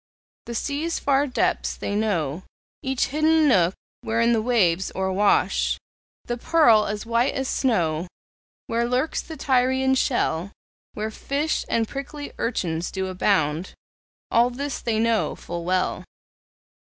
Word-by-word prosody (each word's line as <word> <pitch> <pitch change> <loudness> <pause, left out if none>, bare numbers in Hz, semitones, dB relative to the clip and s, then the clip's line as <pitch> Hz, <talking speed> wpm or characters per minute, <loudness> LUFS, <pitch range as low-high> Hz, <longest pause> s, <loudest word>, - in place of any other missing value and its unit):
The 235 - -5
sea's 300 +7 -2
far 280 +1 +2
depths 255 - 0
they - - -3
know, 180 -8 -1 0.4
Each 265 -2 0
hidden 310 +2 +3
nook, 185 -8 +3 0.3
wherein 230 +1 +2
the 225 - +2
waves 190 -7 +2
o'erwash 190 +2 +2 0.5
The 240 - -3
pearl 235 -7 +4
as 210 +1 -4
white 235 +3 +1
as 265 0 -1
snow; 175 - 0 0.6
Where 235 +1 -1
lurks 255 +5 0
the 320 - -9
Tyrian 260 0 +2
shell, 200 - 0 0.4
Where 215 +1 -3
fish 285 +7 -2
and 225 -1 +1
prickly 285 +3 -7
urchins 175 -8 -1
do 190 -1 -3
abound, 180 -3 0 0.6
All 235 +1 +4
this 275 +3 -4
they 230 -2 -1
know 225 0 +1
full 170 0 -6
well. 185 +1 0
230 Hz, 130 wpm, -24 LUFS, 190-265 Hz, 0.6 s, pearl